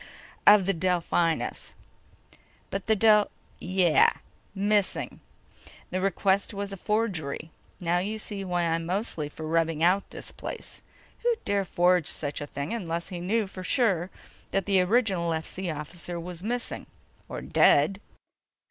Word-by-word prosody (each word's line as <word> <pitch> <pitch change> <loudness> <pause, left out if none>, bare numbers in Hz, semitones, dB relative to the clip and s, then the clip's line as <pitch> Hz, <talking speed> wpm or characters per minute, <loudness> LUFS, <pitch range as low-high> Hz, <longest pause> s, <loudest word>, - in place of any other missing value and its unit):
of 210 -2 +8
the 195 - +2
Delphinus!" 170 -2 0 1.0
"But 195 0 -4
the 220 - +4
Del—" 210 0 +5 0.3
"Yeah. 180 -3 +4 0.5
Missing. 205 0 0 0.7
The 185 - -1
request 195 +2 +1
was 200 0 -3
a - - -6
forgery. 175 -8 -2 0.3
Now 175 0 +1
you 210 +4 -2
see 205 -2 -5
why 180 -2 0
I'm 165 0 0
mostly 180 -5 -2
for 155 +1 -8
rubbing 165 0 +1
out 185 +3 +3
this - - -8
place. - - -8 0.4
Who'd 470 -1 0
dare 200 -1 +1
forge 175 -2 +3
such 145 0 -3
a 145 - -4
thing 140 +6 -4
unless 170 -6 -3
he 180 - -5
knew 210 +5 +1
for 190 -1 -9
sure 185 -4 +1 0.4
that 195 -2 0
the 195 -2 +4
original 190 -4 +2
FC 165 +3 -3
officer 170 +3 -6
was 175 0 -7
missing... 240 +4 -3 0.4
or - - -5
dead?" 175 +8 +4
185 Hz, 140 wpm, -27 LUFS, 165-200 Hz, 1.0 s, of